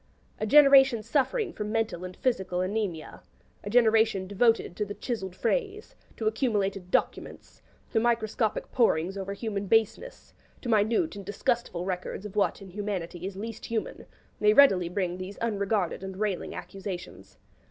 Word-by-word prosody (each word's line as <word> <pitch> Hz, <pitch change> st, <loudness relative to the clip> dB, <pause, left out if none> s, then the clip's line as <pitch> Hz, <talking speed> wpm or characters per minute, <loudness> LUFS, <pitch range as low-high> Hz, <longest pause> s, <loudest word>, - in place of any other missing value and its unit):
A 215 Hz, -, -1 dB
generation 275 Hz, -3 st, +7 dB
suffering 340 Hz, -, 0 dB
from 210 Hz, 0 st, -4 dB
mental 225 Hz, -5 st, -1 dB
and 185 Hz, 0 st, -8 dB
physical 190 Hz, -7 st, -1 dB
anaemia 185 Hz, -5 st, -3 dB, 0.4 s
a 205 Hz, -, -5 dB
generation 220 Hz, -4 st, +3 dB
devoted 205 Hz, -1 st, +1 dB
to 210 Hz, -, -1 dB
the 205 Hz, 0 st, -6 dB
'chiselled 195 Hz, -7 st, -4 dB
phrase,' 425 Hz, -, -2 dB, 0.2 s
to 220 Hz, -, -4 dB
accumulated 205 Hz, -5 st, 0 dB
'documents,' -, -, -2 dB, 0.3 s
to 225 Hz, -, +2 dB
microscopic 225 Hz, -1 st, 0 dB
porings 190 Hz, -6 st, +2 dB
over 195 Hz, 0 st, -4 dB
human 200 Hz, -1 st, -4 dB
baseness, 225 Hz, -, 0 dB, 0.3 s
to 245 Hz, -, -4 dB
minute 220 Hz, -, +2 dB
and 200 Hz, -, -7 dB
disgustful 200 Hz, -2 st, -2 dB
records 185 Hz, +1 st, -4 dB
of 210 Hz, -1 st, -8 dB
what 200 Hz, -1 st, 0 dB
in 190 Hz, -, -12 dB
humanity 185 Hz, -3 st, -4 dB
is 195 Hz, -, -7 dB
least 225 Hz, +2 st, -6 dB
human 230 Hz, -1 st, -4 dB, 0.3 s
may 210 Hz, 0 st, +5 dB
readily 195 Hz, -10 st, +6 dB
bring 180 Hz, -1 st, -2 dB
these 185 Hz, +2 st, -7 dB
unregarded 200 Hz, -5 st, -1 dB
and 190 Hz, -1 st, -7 dB
railing 205 Hz, -3 st, -2 dB
accusations. 180 Hz, -, -8 dB
210 Hz, 150 wpm, -28 LUFS, 190-230 Hz, 0.4 s, generation